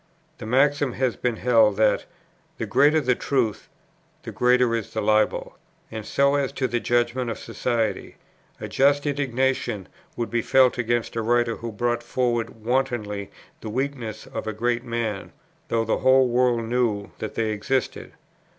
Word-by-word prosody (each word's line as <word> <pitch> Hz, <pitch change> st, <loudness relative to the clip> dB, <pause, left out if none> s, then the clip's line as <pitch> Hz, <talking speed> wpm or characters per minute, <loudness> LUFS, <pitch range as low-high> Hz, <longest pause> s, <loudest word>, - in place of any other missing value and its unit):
The -, -, -7 dB
maxim 140 Hz, +2 st, +2 dB
has 130 Hz, -2 st, 0 dB
been 120 Hz, -2 st, -1 dB
held, 110 Hz, -3 st, +3 dB
that, 110 Hz, -1 st, +2 dB, 0.5 s
"The -, -, -3 dB
greater 150 Hz, +3 st, +4 dB
the 130 Hz, -4 st, +2 dB
truth, 120 Hz, -5 st, -1 dB, 0.5 s
the -, -, -6 dB
greater 125 Hz, -1 st, +3 dB
is 115 Hz, -3 st, -3 dB
the 110 Hz, -, -3 dB
libel." 105 Hz, 0 st, +1 dB, 0.3 s
And 110 Hz, -1 st, -6 dB
so 140 Hz, 0 st, +2 dB
as 140 Hz, -2 st, 0 dB
to 130 Hz, -2 st, -1 dB
the 120 Hz, -, -1 dB
judgment 120 Hz, +1 st, 0 dB
of 115 Hz, -, -4 dB
society, 115 Hz, -5 st, -2 dB, 0.4 s
a -, -, -5 dB
just 145 Hz, +2 st, +2 dB
indignation 130 Hz, -7 st, -1 dB, 0.3 s
would 120 Hz, -, -3 dB
be 120 Hz, 0 st, +1 dB
felt 130 Hz, +1 st, +3 dB
against 120 Hz, -1 st, -1 dB
a 115 Hz, -, 0 dB
writer 120 Hz, 0 st, +1 dB
who 115 Hz, 0 st, -6 dB
brought 120 Hz, +2 st, -1 dB
forward 120 Hz, -2 st, -2 dB
wantonly 120 Hz, -6 st, -1 dB, 0.3 s
the 110 Hz, -, -7 dB
weaknesses 120 Hz, -3 st, -4 dB
of -, -, -4 dB
a 110 Hz, -, -2 dB
great 120 Hz, +2 st, -1 dB
man, 115 Hz, -5 st, -3 dB, 0.3 s
though 115 Hz, -1 st, 0 dB
the 110 Hz, -, 0 dB
whole 130 Hz, 0 st, +5 dB
world 120 Hz, -1 st, +2 dB
knew 115 Hz, -4 st, -1 dB
that 110 Hz, -, -5 dB
they 110 Hz, -1 st, 0 dB
existed. 110 Hz, +5 st, -2 dB
120 Hz, 160 wpm, -24 LUFS, 110-130 Hz, 0.5 s, whole